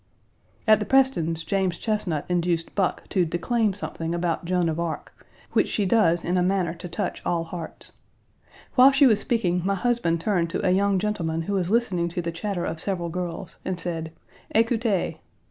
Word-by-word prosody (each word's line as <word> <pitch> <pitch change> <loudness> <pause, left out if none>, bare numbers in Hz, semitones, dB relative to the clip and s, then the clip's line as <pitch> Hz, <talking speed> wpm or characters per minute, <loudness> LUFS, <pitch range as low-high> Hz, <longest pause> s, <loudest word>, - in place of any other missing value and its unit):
At 215 -1 +7
the 210 - -2
Prestons', 170 -12 +2
James 185 0 0
Chesnut 200 -9 -1
induced 175 -1 0
Buck 195 -3 -1
to 185 -3 +2
declaim 205 +6 0
something 165 -4 -4
about 175 0 -1
Joan 180 -1 +1
of 160 0 -1
Arc, 170 -2 -4 0.4
which - - +3
she 205 - 0
does 175 -5 +3
in 180 +1 +1
a - - +2
manner 185 -1 +1
to 175 +1 -8
touch 185 +3 -3
all 170 -1 0
hearts. 165 0 -7 0.8
While 260 +1 +8
she 275 +1 +5
was 220 -5 +5
speaking, 180 -8 0
my 195 +1 +1
husband 215 -7 +1
turned 175 -2 0
to - - -2
a - - +4
young 200 +1 +3
gentleman 175 -5 -1
who 200 - -3
was 185 -3 0
listening 195 -7 +1
to 175 +1 -3
the 170 - -2
chatter 175 +1 -3
of 160 - -4
several 175 -4 -2
girls, 175 +1 -5
and 185 -2 -3
said: 165 -2 -3 0.4
"Écoutez!" 225 -4 +1
180 Hz, 180 wpm, -25 LUFS, 170-210 Hz, 0.8 s, While